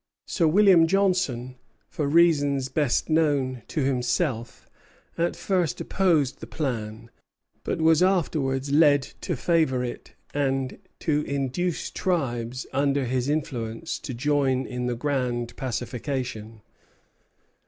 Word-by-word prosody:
Sir 170 -4 +1
William 180 -1 +6
Johnson, 180 -10 0 0.3
for 150 - -3
reasons 145 -4 +3
best 140 -2 +1
known 145 -6 +1
to 155 - -2
himself, 125 -1 -1 0.5
at 170 +1 0
first 180 -5 -1
opposed 165 -9 +1
the - - -8
plan; 115 -5 -4 0.5
but - - -2
was 160 0 +4
afterwards 145 -7 +1
led 145 -2 +5 0.2
to 175 - -2
favor 140 -4 +1
it 120 - -7 0.2
and 135 -2 -1 0.2
to 150 -2 +1
induce 140 +5 -2
tribes 130 -8 -2
under 140 0 +1
his 125 +2 -1
influence 135 -2 -3
to 130 - -6
join 135 0 +1
in 125 0 -3
the 120 - -1
grand 125 -3 -2
pacification. 120 -3 -4
140 Hz, 115 wpm, -25 LUFS, 125-160 Hz, 0.5 s, William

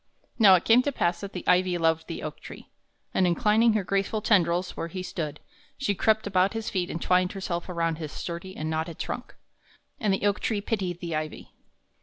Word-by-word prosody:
Now 200 -4 +8
it 175 - 0
came 230 +2 +6
to 285 - -1
pass 175 -9 0
that 200 -1 -6
the 180 - -5
ivy 180 0 +3
loved 165 -1 +1
the 165 - -6
oak 155 - -6
tree, - - -12 0.4
and 185 - +3
inclining 215 +6 +3
her 215 -2 +1
graceful 195 +3 0
tendrils 180 -4 +2
where 165 - -3
he 185 +2 -6
stood, 150 -5 -4 0.4
she 270 -7 0
crept 220 +2 +2
about 185 +1 +2
his 225 -1 -4
feet 180 -4 -1
and 165 - -4
twined 180 +1 +2
herself 185 -3 -4
around 165 -2 -1
his 155 -2 -5
sturdy 185 +4 -6
and 155 - -3
knotted 160 +1 -2
trunk. - - -5 0.6
And 210 -3 +1
the 195 +1 0
oak 205 -1 +2
tree 215 - -1
pitied 195 -5 -3
the 170 -2 -3
ivy. 155 0 -5
185 Hz, 205 wpm, -27 LUFS, 170-205 Hz, 0.6 s, Now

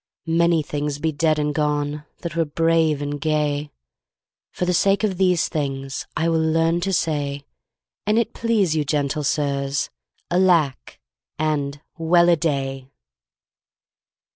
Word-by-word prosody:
Many 165 -1 +2
things 145 0 -3
be 160 +2 -1
dead 155 +1 +1
and 150 0 0
gone 150 0 -1 0.2
That 170 -3 -5
were 165 - +2
brave 160 -1 +1
and 145 0 -4
gay; 150 -1 0 0.8
For 180 - -2
the 180 - +1
sake 200 +4 +2
of 195 -4 0
these 180 -3 +3
things 135 -2 -3
I 165 - +1
will 165 -1 +2
learn 165 +2 +2
to 195 +2 -1
say, 145 -5 -1 0.6
"An 210 +1 +3
it 235 - +1
please 215 -8 +1
you, 155 - +1
gentle 145 0 -1
sirs," 140 -1 -1 0.4
"Alack!" 170 -9 +2 0.4
and 145 -2 -1 0.2
"Well 170 +1 +4
a 170 - +6
day!" 135 -5 -2
155 Hz, 140 wpm, -22 LUFS, 145-170 Hz, 0.8 s, a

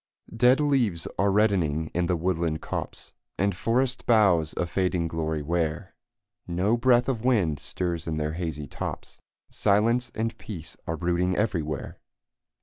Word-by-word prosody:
Dead 125 +4 +5
leaves 125 - +1
are 100 +2 +3
reddening 90 -7 +1
in 90 0 0
the 90 - +1
woodland 85 -2 -1
copse, - - -6 0.2
And 100 +1 +1
forest 125 +6 0
boughs 95 -9 +4
a - - +1
fading 90 -1 0
glory 80 -2 -2
wear; 85 +3 -2 0.5
No 90 +6 +1
breath 120 0 +3
of 120 -4 -1
wind 95 - +2
stirs 85 -3 -3
in 80 -1 -2
their 75 0 -1
hazy 80 -3 -4
tops, - - -6 0.3
Silence 115 +4 +2
and 115 +1 -2
peace 85 -8 -8
are 80 - -2
brooding 90 +1 0
everywhere. 80 -9 -2
90 Hz, 145 wpm, -26 LUFS, 80-110 Hz, 0.5 s, Dead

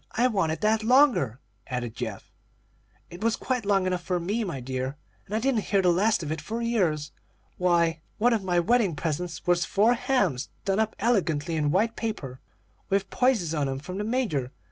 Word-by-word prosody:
I 240 - +2
wanted 165 -8 0
that 220 +1 +2
longer," 230 - +4 0.3
added 125 -3 -3
Geoff. - - -6 0.8
"It 175 +4 -8
was 230 0 +2
quite 250 -5 -2
long 195 -2 +3
enough 180 -1 -1
for 180 0 -1
me, 205 +7 -1
my 170 -9 -4
dear, 130 +2 -4 0.3
and 205 - -4
I - - +2
didn't 240 -3 0
hear 200 - +2
the 180 - +5
last 200 +1 +2
of 155 - -4
it 155 -1 -3
for 225 +9 -4
years. 180 -11 0 0.5
Why, 170 -3 +2 0.2
one 240 +3 +3
of 220 -4 0
my 180 -2 +2
wedding 205 -2 +2
presents 165 +4 -3
was 175 -1 +3
four 215 +4 +3
hams 205 - 0 0.2
done 195 +1 +1
up 220 0 0
elegantly 170 -8 +1
in 150 -2 +1
white 215 +8 +1
paper, 140 - -4 0.5
with 195 0 0
posies 225 -11 +2
on 145 -3 0
'em, 135 - -2
from 180 +8 -6
the - - -1
Major. 210 - -1
185 Hz, 190 wpm, -26 LUFS, 155-220 Hz, 0.8 s, the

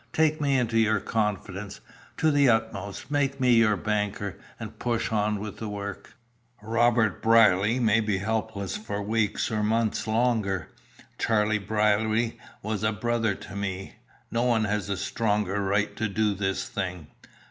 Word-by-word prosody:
Take 155 0 +2
me 140 -2 +2
into 115 -2 +1
your 110 -2 +3
confidence, 100 -2 -3 0.4
to 160 -1 +3
the 145 -2 +4
utmost, 110 +1 -1
make 140 -1 0
me 125 -1 +4
your 110 -3 +4
banker, 105 0 -2 0.2
and - - -8
push 120 -2 -1
on 105 -1 +1 0.2
the 110 - -5
work. 100 -1 -7 0.5
Robert 115 -2 +2
Brierly 115 0 +4
may 110 -2 +3
be 105 -3 0
helpless 105 -1 -2
for 105 -1 -4
weeks 110 0 0
or 110 -1 0
months 110 +1 0
longer. 110 -5 0 0.5
Charlie 110 -1 +2
Brierly 110 +2 +1 0.2
was 105 -1 -2
a 110 0 +2
brother 115 0 0
to 95 - -10
me. 95 -1 -4 0.3
No 115 - 0
one 120 -3 +2
has 105 -1 -1
a 100 - -1
stronger 105 0 -1
right 100 +1 0
to 110 - 0
do 105 +1 +1
this 95 0 -2
thing." 90 -6 -4
110 Hz, 150 wpm, -26 LUFS, 100-115 Hz, 0.5 s, the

